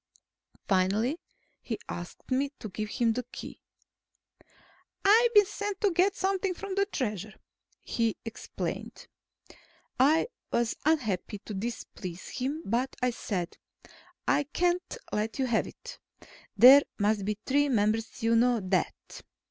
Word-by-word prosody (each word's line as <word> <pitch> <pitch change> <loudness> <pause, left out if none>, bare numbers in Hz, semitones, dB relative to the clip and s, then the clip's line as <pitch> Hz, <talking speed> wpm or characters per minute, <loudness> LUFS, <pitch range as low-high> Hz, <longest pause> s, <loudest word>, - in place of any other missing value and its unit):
Finally, 205 - +2 0.4
he 225 - -4
asked 175 +8 -8
me 270 +2 +2
to 215 - -7
give 215 +2 -4
him 230 0 +1
the 250 - -2
Key. - - -9 1.4
"I've 460 +4 +6
been 415 -1 +8
sent 410 0 -4
to 410 -3 +3
get 370 +4 +3
something 385 -1 0
from 395 +1 -5
the 395 +1 +1
Treasure," 215 - -3 0.5
he 230 -2 0
explained. 225 - -5 0.9
I 305 - +4 0.2
was 235 -1 +1
unhappy 220 - 0
to 215 - -6
displease 190 -4 -6
him, 280 +6 -3
but 245 +5 -1
I 250 - +3
said, 185 -7 -4 0.7
"I 290 - +3
can't 350 +4 -1
let 215 +1 -2
you 265 - +1
have 235 -3 +1
it. - - -11 0.6
There 260 +6 +10 0.2
must 205 -1 +1
be 210 +1 -2
three 285 +2 +2
members. 220 -1 0
You 230 0 +3
know 240 0 +4
that." 185 -2 0
240 Hz, 130 wpm, -29 LUFS, 210-325 Hz, 1.4 s, There